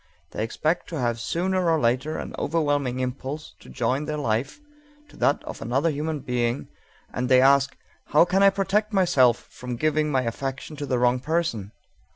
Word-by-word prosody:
They 110 - -3
expect 155 +9 -1
to 165 - -4
have 120 -2 0
sooner 180 +5 0
or 160 -1 +3
later 130 +5 0
an - - -6
overwhelming 145 -6 0
impulse 135 +4 -5
to - - -15
join 130 - -1
their 150 0 -3
life 125 - -1 0.5
to - - -17
that - - +1
of - - -8
another 135 +7 +1
human 150 0 -3
being, 120 0 -1 0.4
and 125 0 -2
they 130 -1 +6
ask: 140 +1 +4 0.3
"How 150 - +5
can 185 +2 +1
I 200 - +8
protect 200 +2 0
myself 130 - +4
from 125 0 -6
giving 155 +3 +1
my 130 -3 +1
affection 135 +5 -4
to 145 -1 -5
the 130 - +1
wrong 125 +1 +2
person? 130 - -2
140 Hz, 180 wpm, -25 LUFS, 125-160 Hz, 0.5 s, I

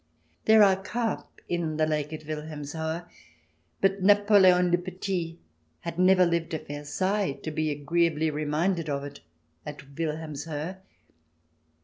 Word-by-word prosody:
There 220 -1 +7
are 190 -1 +4
carp 230 +3 -3
in 165 -3 -2
the 155 - +3
lake 150 -1 -1
at 155 -1 -7
Wilhelmshohe, 155 +2 -4 0.8
but 195 0 +2
Napoleon 190 -3 +5
le 175 - +3
Petit 180 -2 -4 0.4
had 170 0 -5
never 185 0 +6
lived 170 -1 -1
at 155 - -6
Versailles, 180 +5 -1
to 155 - -3
be 155 0 -1
agreeably 160 +2 +1
reminded 155 +3 -1
of 140 -1 -2
it 145 0 -8 0.4
at 150 0 -7 0.2
Wilhelmshohe. 155 +2 -4
165 Hz, 125 wpm, -27 LUFS, 150-185 Hz, 0.8 s, There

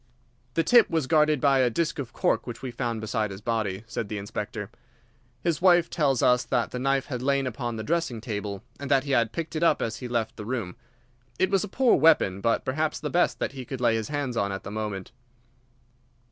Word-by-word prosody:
"The 165 - +3
tip 235 +5 +6
was 160 -4 0
guarded 150 0 +3
by 135 0 +4
a 125 -1 +4
disk 165 +5 -1
of 125 -4 -5
cork - - 0
which 120 +1 -7
we 130 - -4
found 120 -1 -3
beside 110 0 -1
his 95 0 -8
body," 105 -3 -2
said 115 -2 -4
the 105 - -3
Inspector. 105 +1 -5 0.7
"His 170 -2 0
wife 175 -2 +5
tells 140 -6 +1
us 125 -1 +4
that 120 - 0
the 125 - -4
knife 135 +1 +1
had 125 -4 -4
lain 140 +1 +1
upon 120 -1 -3
the 110 - -4
dressing 160 -4 -1
table, 105 -3 -5 0.2
and 140 -2 -6
that 135 -2 +4
he 140 - -4
had 115 -4 +2
picked 165 -1 -5
it 155 - -1
up 170 - +4
as 115 -1 -2
he 125 - -6
left 115 -2 -2
the 105 - -6
room. 115 -7 -3 0.6
It 185 - +1
was 195 -1 +2
a - - -4
poor 250 +5 +3
weapon, 135 - +4
but 115 +1 +1
perhaps 155 +4 -1
the 150 - -4
best 175 - +2
that - - -2
he 135 -2 -7
could 130 +1 -6
lay 120 -2 +3
his 110 -1 -1
hands 145 -4 -2
on 100 -3 0
at 95 -1 -5
the 95 - -7
moment." 105 -3 -4
125 Hz, 230 wpm, -26 LUFS, 110-150 Hz, 0.7 s, tip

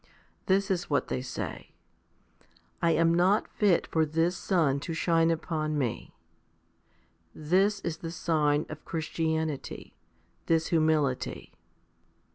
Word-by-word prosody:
This 195 +1 +2
is 175 -2 -1
what 145 - 0
they 125 - -2
say: 125 0 -6 0.5
" - - -35
I 170 - +3
am 165 0 +3
not 185 +5 +3
fit 200 -5 +2
for 160 - +1
this 165 +3 0
sun 160 -8 +1
to 165 +3 -5
shine 165 -1 +2
upon 155 -2 -1
me." 125 -6 -3 1.2
This 195 +6 +1
is 165 -2 -3
the 165 - -6
sign 155 -3 +1
of 155 0 -9
Christianity, 160 -2 -3 0.5
this 165 -1 +2
humility. 155 -5 0
165 Hz, 120 wpm, -28 LUFS, 155-170 Hz, 1.2 s, I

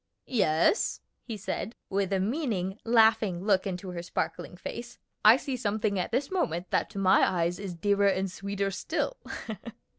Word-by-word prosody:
"Yes," 185 - +2 0.2
he 225 -3 -6
said, 215 +3 -4
with 195 0 -1
a 195 - +2
meaning, 205 - -1
laughing 220 -5 +4
look 200 -2 +3
into 185 0 -4
her 175 -1 -4
sparkling 175 +1 -4
face. 235 +5 -7 0.3
"I 220 +3 +9
see 275 -1 -3
something 215 -3 0
at 180 - -2
this 265 +7 0
moment 180 - -1
that - - +1
to - - -10
my 190 0 +5
eyes 175 0 +1
is 195 -3 -5
dearer 200 +2 +2
and 190 -1 +1
sweeter 200 +1 -2
still. 350 - -2
200 Hz, 160 wpm, -29 LUFS, 185-225 Hz, 0.3 s, I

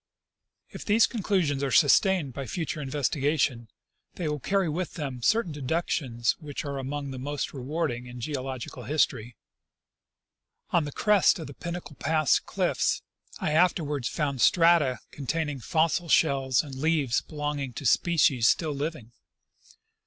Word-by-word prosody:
If - - -8
these 220 +2 +4
con 230 -3 -5
clusions 170 -9 +1
are 140 - 0
sustained 160 +1 +4
by 135 0 -5
future 160 +2 -3
investigation, 140 -2 0 0.5
they 175 - -3
will 150 0 -2
carry 195 +5 0
with 170 +3 -3
them 135 -6 -5
certain 220 - +2
deductions 135 -5 -1
which 150 -3 -6
are 140 -1 -4
among 140 +1 -4
the 130 - -6
most 145 +2 -4
remark 150 +3 -2
able 120 +1 -7
in 125 0 -9
geological 130 -1 -5
history. 125 -6 0 1.4
On 170 -3 +2
the 145 - -5
crest 210 +5 +3
of 160 - -6
the 140 - -9
Pinnacle 170 -1 -7
pass 155 -2 +2
cliffs - - -1 0.3
I - - -2
afterwards 155 -5 +1
found 140 -5 -2
strata 165 -6 +4
containing 145 0 -3
fossil 165 +5 0
shells 135 -5 +3
and 145 -3 -9
leaves 140 -3 +1
belonging 145 -4 -4
to - - -7
species 145 -9 +3
still 155 +1 +2
living. 140 -5 -5
145 Hz, 145 wpm, -27 LUFS, 135-165 Hz, 1.4 s, these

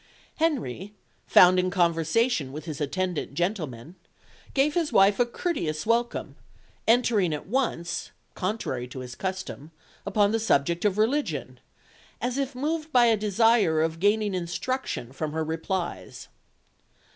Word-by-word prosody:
Henry, 210 - -1 0.3
found 185 0 +7
in 185 0 +1
conversation 170 - +1
with 150 +2 -7
his 155 -2 -6
attendant 175 0 -2
gentlemen, 160 - -3 0.6
gave 285 +2 +3
his 330 -2 0
wife 195 +2 +5
a 245 - +3
courteous 170 - -2
welcome, 235 +1 0 0.5
entering 220 -8 +3
at 150 - -8
once 200 -7 -2 0.2
contrary 180 - -3
to 130 +1 -8
his 125 -1 -8
custom 190 -2 -5 0.3
upon 205 0 +2
the 225 - +1
subject 170 -3 +1
of 205 -1 +2
religion, 265 +8 -1 0.6
as 250 +2 -2
if 275 -1 -2
moved 310 +4 -2
by 245 -3 +5
a 230 -1 +5
desire 210 -4 +3
of 165 0 -1
gaining 205 +1 +2
instruction 175 - -3
from 150 +2 -4
her 160 0 -1
replies. 160 - -4
190 Hz, 135 wpm, -26 LUFS, 160-235 Hz, 0.6 s, found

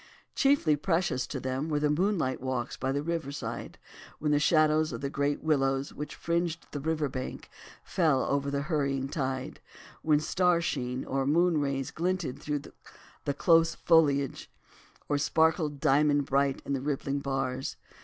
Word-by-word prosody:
Chiefly 270 - +3
precious 165 -5 0
to 135 - -4
them 130 +4 -3
were 150 -1 +1
the 150 0 +2
moonlight 170 -5 0
walks 130 -2 -2
by 130 - -2
the 140 +1 -1
river 165 -3 -2
side 115 -4 -6 0.4
when 150 0 -1
the 145 - +4
shadows 155 0 +3
of 115 - -5
the 140 0 -3
great 145 +1 -1
willows 135 -3 +1
which 150 0 -6
fringed 170 0 -1
the 145 - -4
river 155 0 0
bank 130 -1 -6 0.3
fell 155 -7 +2
over 140 0 0
the 140 0 -1
hurrying 140 -4 -1
tide, 135 0 -3 0.4
when 150 -2 +3
star 180 +2 +2
sheen 130 -6 -2
or 135 0 -1
moonrays 145 -4 +1
glinted 175 -5 -2
through 150 -1 -2 0.6
the 140 - 0
close 165 +1 +4
foliage 145 -5 +2 0.6
or 145 -1 +1
sparkled 160 -1 +2
diamond 145 0 +3
bright 140 0 +1
on 140 - -2
the 135 - -1
rippling 140 0 -2
bars. 135 -1 -2
145 Hz, 155 wpm, -29 LUFS, 135-160 Hz, 0.6 s, the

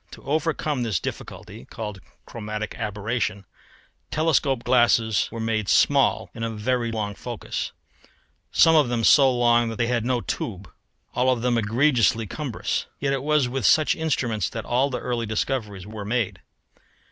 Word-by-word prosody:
To - - -12
overcome 150 -1 -1
this 110 -7 0
difficulty - - -8
(called 105 - -7 0.2
chromatic 110 -2 -5
aberration) 105 -2 -3 0.6
telescope 145 -5 +1
glasses 115 -3 +3
were 115 - -6
made 110 -2 -1
small - - +3
and 115 - -6
of 115 -1 -3
very 120 +1 0
long 105 -2 -3
focus: 120 +1 -5 0.8
some 165 0 +5
of 150 -6 +4
them 120 -1 -1
so 135 +3 +6
long 120 -1 +3
that 115 - -5
they 115 - 0
had 115 -1 0
no 125 0 0
tube, 100 -4 -5 0.5
all 125 +1 +2
of 125 -2 0
them 125 -1 +2
egregiously 115 0 +2
cumbrous. 130 +2 -3
Yet 140 -1 0
it 135 - -1
was 150 -2 +2
with 130 0 -3
such 155 - +4
instruments 130 - -1
that 110 - -6
all 130 +4 +1
the 130 - -3
early 120 -2 -2
discoveries 105 -4 -2
were 105 0 -7
made. 110 0 -2
120 Hz, 160 wpm, -24 LUFS, 110-130 Hz, 0.8 s, so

